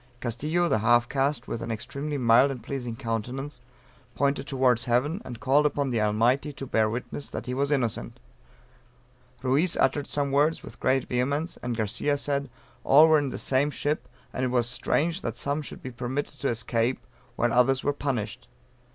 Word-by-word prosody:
Castillo 150 Hz, +9 st, -1 dB
(a 110 Hz, -10 st, +2 dB
half 120 Hz, +2 st, +4 dB
caste, 135 Hz, -1 st, -1 dB
with 115 Hz, -, -4 dB
an -, -, -5 dB
extremely 140 Hz, +7 st, -4 dB
mild 125 Hz, +2 st, +5 dB
and 130 Hz, -5 st, -6 dB
pleasing 125 Hz, -3 st, -4 dB
countenance,) 125 Hz, +3 st, -4 dB, 0.5 s
pointed 140 Hz, 0 st, 0 dB
towards 125 Hz, -4 st, +2 dB
heaven, 140 Hz, -, +1 dB
and 120 Hz, -2 st, -8 dB
called 145 Hz, +2 st, +3 dB
upon 145 Hz, -2 st, 0 dB
the 115 Hz, -3 st, +1 dB
Almighty 115 Hz, +7 st, +2 dB
to 135 Hz, -1 st, -7 dB
bear 110 Hz, -4 st, +2 dB
witness 125 Hz, +5 st, -5 dB
that -, -, -6 dB
he 125 Hz, -, -3 dB
was 140 Hz, +2 st, 0 dB
innocent; 125 Hz, -6 st, -1 dB, 1.2 s
Ruiz 145 Hz, +7 st, +2 dB
uttered 145 Hz, -2 st, +1 dB
some 140 Hz, -1 st, -1 dB
words 150 Hz, +4 st, +2 dB
with -, -, -11 dB
great 130 Hz, 0 st, +1 dB
vehemence; 140 Hz, +6 st, -1 dB
and 120 Hz, -2 st, -3 dB
Garcia 120 Hz, +7 st, 0 dB
said 140 Hz, -1 st, -1 dB, 0.3 s
"all 150 Hz, +4 st, +7 dB
were 155 Hz, -1 st, +5 dB
in 145 Hz, -2 st, -2 dB
the -, -, -5 dB
same 135 Hz, +2 st, +2 dB
ship; 150 Hz, +1 st, -2 dB, 0.3 s
and 130 Hz, -, -2 dB
it -, -, +2 dB
was 120 Hz, -1 st, +1 dB
strange 165 Hz, +8 st, 0 dB
that -, -, -4 dB
some 145 Hz, +2 st, -1 dB
should 145 Hz, -, -9 dB
be 130 Hz, -, -5 dB
permitted 130 Hz, +4 st, -4 dB
to 140 Hz, -, 0 dB
escape 115 Hz, +2 st, -1 dB, 0.3 s
while 120 Hz, -1 st, +1 dB
others 130 Hz, +2 st, +3 dB
were 145 Hz, -, +1 dB
punished." 125 Hz, -7 st, -3 dB
130 Hz, 180 wpm, -27 LUFS, 120-145 Hz, 1.2 s, all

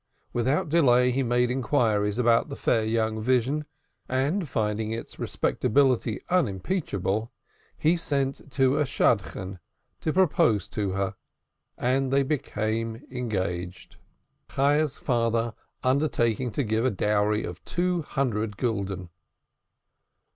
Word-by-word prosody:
Without 130 Hz, +7 st, +1 dB
delay, 125 Hz, -6 st, +4 dB
he 135 Hz, +2 st, 0 dB
made 125 Hz, 0 st, +2 dB
inquiries 110 Hz, -6 st, +1 dB
about 120 Hz, -2 st, +3 dB
the -, -, -5 dB
fair 115 Hz, -2 st, +1 dB
young 110 Hz, 0 st, 0 dB
vision, 130 Hz, +5 st, +1 dB, 0.4 s
and 145 Hz, +7 st, 0 dB
finding 110 Hz, -1 st, -1 dB
its 115 Hz, +1 st, -6 dB
respectability 125 Hz, -4 st, +1 dB
unimpeachable, 110 Hz, -, -1 dB, 0.5 s
he 160 Hz, +3 st, +3 dB
sent 140 Hz, -5 st, -1 dB, 0.2 s
a 135 Hz, +3 st, +3 dB
Shadchan 100 Hz, -8 st, 0 dB, 0.4 s
to 155 Hz, -, -1 dB
propose 140 Hz, -, +3 dB
to 100 Hz, -3 st, -2 dB
her, 100 Hz, 0 st, -1 dB, 0.6 s
and 130 Hz, +2 st, +1 dB
they 140 Hz, 0 st, +4 dB
were 135 Hz, -, 0 dB
affianced: 110 Hz, -6 st, -3 dB, 0.5 s
Chayah's 145 Hz, +2 st, +2 dB
father 115 Hz, -2 st, 0 dB, 0.3 s
undertaking 130 Hz, -3 st, +1 dB
to 120 Hz, +6 st, -1 dB
give 110 Hz, 0 st, 0 dB
a 130 Hz, -, +3 dB
dowry 105 Hz, +1 st, +1 dB
of 85 Hz, 0 st, -7 dB
two 175 Hz, 0 st, 0 dB
hundred 110 Hz, -8 st, -2 dB
gulden. 100 Hz, -6 st, -2 dB
120 Hz, 110 wpm, -26 LUFS, 105-135 Hz, 0.6 s, delay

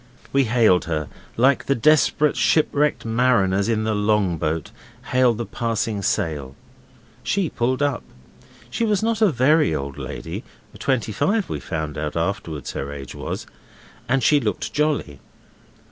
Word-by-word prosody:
We 135 Hz, -1 st, +4 dB
hailed 110 Hz, -6 st, +3 dB
her 75 Hz, -3 st, -2 dB, 0.3 s
like 130 Hz, +3 st, +3 dB
the 140 Hz, -, +2 dB
desperate 150 Hz, +3 st, +3 dB
shipwrecked 150 Hz, -3 st, +2 dB
mariners 110 Hz, -4 st, +2 dB
in 110 Hz, -1 st, +1 dB
the 110 Hz, 0 st, 0 dB
long 105 Hz, -5 st, +1 dB
boat 75 Hz, 0 st, -2 dB, 0.4 s
hail 125 Hz, -2 st, +4 dB
the 120 Hz, +2 st, -4 dB
passing 115 Hz, -3 st, -2 dB
sail. 75 Hz, -7 st, -2 dB, 0.7 s
She 195 Hz, -5 st, -1 dB
pulled 130 Hz, +4 st, 0 dB
up. 140 Hz, -4 st, 0 dB, 0.7 s
She 230 Hz, -, -1 dB
was 215 Hz, -2 st, +1 dB
not 225 Hz, -1 st, 0 dB
a 215 Hz, -, +6 dB
very 140 Hz, -, +3 dB
old 70 Hz, -1 st, -5 dB
lady -, -, -6 dB, 0.4 s
twenty 130 Hz, -5 st, 0 dB
five 200 Hz, -, 0 dB
we -, -, -3 dB
found 80 Hz, -3 st, -4 dB
out 75 Hz, -1 st, -3 dB
afterwards 80 Hz, -4 st, -3 dB
her 70 Hz, -, -5 dB
age 70 Hz, -2 st, -8 dB
was -, -, -5 dB, 0.6 s
and 135 Hz, 0 st, +2 dB
she 145 Hz, +5 st, +5 dB
looked 105 Hz, -7 st, -3 dB
jolly. 145 Hz, -, -1 dB
115 Hz, 145 wpm, -22 LUFS, 85-140 Hz, 0.7 s, a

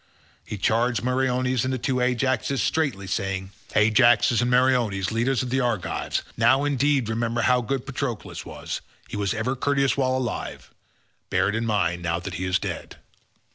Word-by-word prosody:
He 105 Hz, -, -6 dB
charged 115 Hz, +5 st, +1 dB
Meriones 125 Hz, -1 st, +1 dB
and 130 Hz, -, -1 dB
the 130 Hz, -, -1 dB
two 130 Hz, +1 st, -1 dB
Ajaxes 125 Hz, +1 st, 0 dB
straitly 140 Hz, -12 st, 0 dB
saying, 95 Hz, 0 st, -3 dB, 0.2 s
"Ajaxes 115 Hz, +2 st, +4 dB
and 120 Hz, -, +1 dB
Meriones, 125 Hz, -6 st, +2 dB
leaders 120 Hz, +3 st, +1 dB
of 125 Hz, -, -5 dB
the 130 Hz, -, +2 dB
Argives, 120 Hz, -7 st, -1 dB
now 130 Hz, +5 st, +4 dB
indeed 140 Hz, -3 st, +1 dB
remember 115 Hz, +1 st, -1 dB
how 125 Hz, -1 st, +3 dB
good 130 Hz, +2 st, -3 dB
Patroclus 135 Hz, -4 st, -4 dB
was; -, -, -6 dB, 0.3 s
he -, -, -6 dB
was 100 Hz, +1 st, -1 dB
ever 115 Hz, +5 st, -1 dB
courteous 140 Hz, +1 st, +1 dB
while 130 Hz, -1 st, +1 dB
alive, 120 Hz, -4 st, -4 dB, 0.6 s
bear -, -, +2 dB
it -, -, -2 dB
in 115 Hz, +1 st, -1 dB
mind 95 Hz, -5 st, 0 dB
now 85 Hz, -1 st, -1 dB
that 90 Hz, +1 st, -6 dB
he 95 Hz, -, -3 dB
is 95 Hz, 0 st, +2 dB
dead." -, -, -6 dB
120 Hz, 170 wpm, -24 LUFS, 105-130 Hz, 0.6 s, Ajaxes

